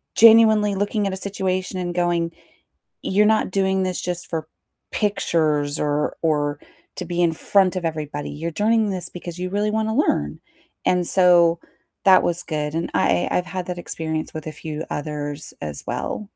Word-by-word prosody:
genuinely 220 Hz, -2 st, +6 dB
looking 205 Hz, +1 st, 0 dB
at 195 Hz, -, -2 dB
a -, -, -3 dB
situation 190 Hz, -1 st, -2 dB
and 175 Hz, -1 st, -3 dB
going, 175 Hz, -1 st, +1 dB, 0.7 s
"You're 205 Hz, +2 st, +2 dB
not 220 Hz, 0 st, +3 dB
doing 190 Hz, 0 st, +1 dB
this 185 Hz, -1 st, -2 dB
just 180 Hz, 0 st, -3 dB
for 160 Hz, -2 st, -3 dB, 0.4 s
pictures 155 Hz, -8 st, 0 dB
or 150 Hz, 0 st, 0 dB
or 145 Hz, -2 st, 0 dB, 0.4 s
to -, -, -4 dB
be 175 Hz, 0 st, -1 dB
in 170 Hz, -, +3 dB
front 190 Hz, +3 st, +2 dB
of 175 Hz, -, -3 dB
everybody, 150 Hz, -2 st, -4 dB
you're 165 Hz, +3 st, -4 dB
doing 215 Hz, +5 st, +2 dB
this 180 Hz, -3 st, -3 dB
because 175 Hz, -1 st, -8 dB
you 185 Hz, 0 st, -3 dB
really 205 Hz, +2 st, 0 dB
wanna 220 Hz, 0 st, 0 dB
learn," 75 Hz, -, 0 dB, 0.5 s
and 180 Hz, -1 st, +2 dB
so 175 Hz, -2 st, +5 dB, 0.5 s
that 190 Hz, -1 st, +7 dB
was 175 Hz, 0 st, -1 dB
good, 150 Hz, -1 st, -3 dB
and 165 Hz, +1 st, -2 dB
I 90 Hz, -, +2 dB
I've 180 Hz, -, +1 dB
had 185 Hz, -2 st, -4 dB
that 180 Hz, -1 st, -4 dB
experience 160 Hz, -2 st, -4 dB
with 155 Hz, -1 st, -6 dB
a -, -, -3 dB
few 155 Hz, 0 st, -6 dB
others 145 Hz, 0 st, -4 dB
as 75 Hz, -2 st, -5 dB
well. 210 Hz, -, -3 dB
175 Hz, 170 wpm, -22 LUFS, 155-195 Hz, 0.7 s, that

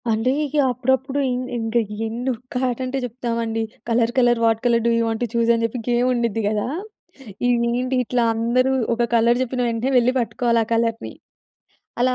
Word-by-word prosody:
అంటే 225 Hz, +3 st, +1 dB
ఇగ 295 Hz, 0 st, -4 dB, 0.2 s
అప్పుడప్పుడు 265 Hz, +2 st, 0 dB
ఇంగ్ 250 Hz, +1 st, -3 dB
ఇంగా 225 Hz, +1 st, 0 dB, 0.3 s
ఎన్ను 235 Hz, +4 st, -3 dB
ఒక్క 250 Hz, +1 st, -6 dB
ఆటంటే 255 Hz, +2 st, -3 dB
చెప్తామండి. 230 Hz, -2 st, -3 dB, 0.3 s
Colour 230 Hz, 0 st, +2 dB
colour 240 Hz, -1 st, +3 dB
what 225 Hz, -1 st, +2 dB
colour 235 Hz, -1 st, +3 dB
do -, -, +3 dB
you -, -, +2 dB
want 225 Hz, 0 st, -2 dB
to -, -, 0 dB
చూసని 230 Hz, 0 st, +2 dB
చెప్పి 230 Hz, +2 st, -3 dB
గేమ్ముండుద్ది 240 Hz, -2 st, +1 dB
గదా! 210 Hz, +1 st, -1 dB, 0.8 s
ఇగ -, -, +4 dB, 0.3 s
ఏంటి 255 Hz, +1 st, -1 dB
ఇట్లా 245 Hz, +1 st, 0 dB
అందరూ 240 Hz, +3 st, +1 dB, 0.2 s
ఒక 235 Hz, 0 st, 0 dB
కలర్ 235 Hz, +2 st, +3 dB
చెప్పిన 255 Hz, 0 st, -3 dB
వెంటనే 230 Hz, +3 st, -1 dB
వెళ్లి 250 Hz, +1 st, +3 dB
పట్టుకోవాలి 235 Hz, -1 st, +1 dB
ఆ -, -, -22 dB
కలర్‌ని. 230 Hz, 0 st, -1 dB, 0.9 s
అలా 255 Hz, 0 st, +2 dB
240 Hz, 170 wpm, -21 LUFS, 230-255 Hz, 0.9 s, ఇగ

